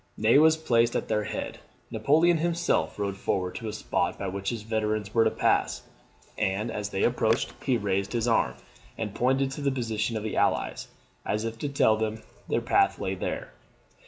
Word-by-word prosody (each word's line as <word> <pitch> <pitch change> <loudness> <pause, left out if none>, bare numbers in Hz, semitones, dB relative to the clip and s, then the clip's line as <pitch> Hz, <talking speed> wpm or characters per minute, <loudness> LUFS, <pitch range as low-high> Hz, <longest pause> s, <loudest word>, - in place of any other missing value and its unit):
Ney 110 +6 +5
was 160 +1 +5
placed 120 -6 +2
at - - -2
their 105 -1 +1
head. - - -5 0.3
Napoleon 160 +4 +3
himself 170 +1 0
rode 100 -1 -2
forward 90 -2 -1
to 115 - -6
a - - -2
spot 105 - -1
by 100 - -3
which 95 +1 -3
his 115 -3 -4
veterans 110 -1 -1
were 115 - +5
to 110 - +3
pass; - - +1 0.6
and, 105 +4 0
as 105 -2 -3
they 95 - -1
approached, 115 -1 +1
he 130 -3 +2
raised 100 -1 -1
his 120 0 0
arm, 85 - +2 0.4
and 105 -3 -4
pointed 135 +3 +1
to 140 - -6
the 140 - +2
position 115 -3 -2
of 105 - -4
the 110 - -3
Allies, - - 0 0.4
as 105 +1 -1
if 115 0 -5
to 145 - -2
tell 110 -6 +3
them 110 0 -1
that 110 - -14 0.2
their - - 0
path 395 0 +3
lay - - -2
there. - - -4
110 Hz, 195 wpm, -27 LUFS, 105-130 Hz, 0.6 s, Ney